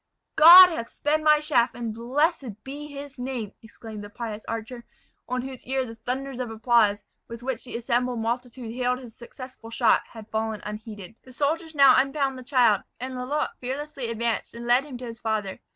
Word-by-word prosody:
"God 355 +4 +11
hath 235 -9 -5
sped 305 +1 0
my 305 -1 +5
shaft, 295 -6 +1
and 230 -2 -4
blessed 255 - -1
be 290 +2 -7
His 280 -2 -9
name!" 245 -5 -4
exclaimed 220 -1 -10
the 205 - -9
pious 220 -1 -6
archer, 230 +2 -5 0.5
on 250 0 -2
whose 265 -1 -8
ear 265 0 0
the 225 - -8
thunders 255 +3 -5
of 250 -2 -3
applause, 225 -2 +2 0.2
with 230 +1 -9
which 260 -2 -4
the 245 - -5
assembled 240 +1 -1
multitude 235 +1 -4
hailed 250 0 0
his 245 -3 -12
successful 250 -1 -11
shot, 230 - +3
had 225 -2 -12
fallen 220 -1 -2
unheeded. 210 -1 -8
The 255 - -16
soldiers 315 +4 -2
now 275 -2 +7
unbound 275 0 -1
the - - -10
child; 245 -6 +3 0.2
and 260 +1 -5
Lalotte 255 +4 -3
fearlessly 265 -1 -5
advanced, 230 0 -2
and 235 0 -7
led 245 +3 +3
him 270 -4 -8
to 250 - -8
his 230 -1 -8
father. 215 -4 -2
245 Hz, 185 wpm, -25 LUFS, 225-270 Hz, 0.5 s, God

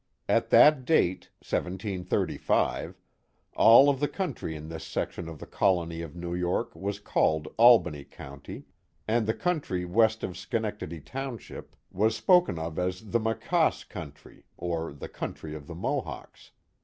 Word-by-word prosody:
At - - +2
that 150 -3 +6
date 110 - +1
(1735). 95 0 -1 0.6
all 120 +5 +8
of 140 -2 +2
the 145 - +1
country 145 - -4
in 75 0 -8
this 80 -1 -7
section 85 -2 -4
of 80 - -8
the - - -9
colony 85 -4 0
of 80 -2 -8
New 85 0 -5
York 90 0 -1
was 100 +1 -3
called 80 -1 0
Albany 110 - +5
County, 70 -1 -10 0.4
and 110 0 +1
the 110 - +1
country 145 - -1
west 110 +4 +2
of 90 - -4
Schenectady 95 -3 -4
township 130 - -7 0.2
was 110 +4 +1
spoken 175 - +4
of 80 +1 -4
as 90 +3 -3
the 115 - +3
Maquaase 115 +10 0
country, 75 -7 -10
or 85 -2 -3
the 70 - -8
country 75 -1 -6
of 75 -2 -9
the 85 - -8
Mohawks. 85 - -5
90 Hz, 145 wpm, -28 LUFS, 80-115 Hz, 0.6 s, all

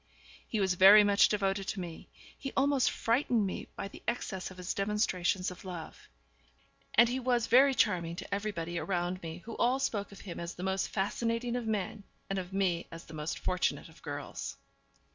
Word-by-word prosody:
He 220 - -1
was 190 -2 +2
very 195 +3 +9
much 205 0 +5
devoted 195 -1 0
to 195 - -2
me; 170 -3 -7 0.3
he 270 - -6
almost 275 -1 +3
frightened 230 -2 +1
me 190 - -4
by - - -4
the - - -12
excess 205 -6 -2
of 185 - -12
his 180 0 -3
demonstrations 195 -3 0
of 180 - -11
love. 175 -4 -8 0.9
And 235 +2 +7
he 250 +2 -1
was 245 -2 +1
very 265 +3 +6
charming 170 -7 +1
to 185 - -6
everybody 175 -5 -2
around 180 0 -2
me, 165 +1 -7
who 230 - -6
all 250 +2 +3
spoke 220 -8 -2
of 200 - -11
him 180 -4 -7
as 170 +1 -5
the 180 - -7
most 190 0 0
fascinating 230 +4 -1
of 245 -2 -3
men, 210 -1 -2 0.3
and 195 - 0
of 180 0 -6
me 185 -3 0
as 165 0 -9
the 160 - -12
most 150 +1 -3
fortunate 180 -2 -1
of 160 - -18
girls. 145 -2 -6
195 Hz, 190 wpm, -31 LUFS, 180-230 Hz, 0.9 s, very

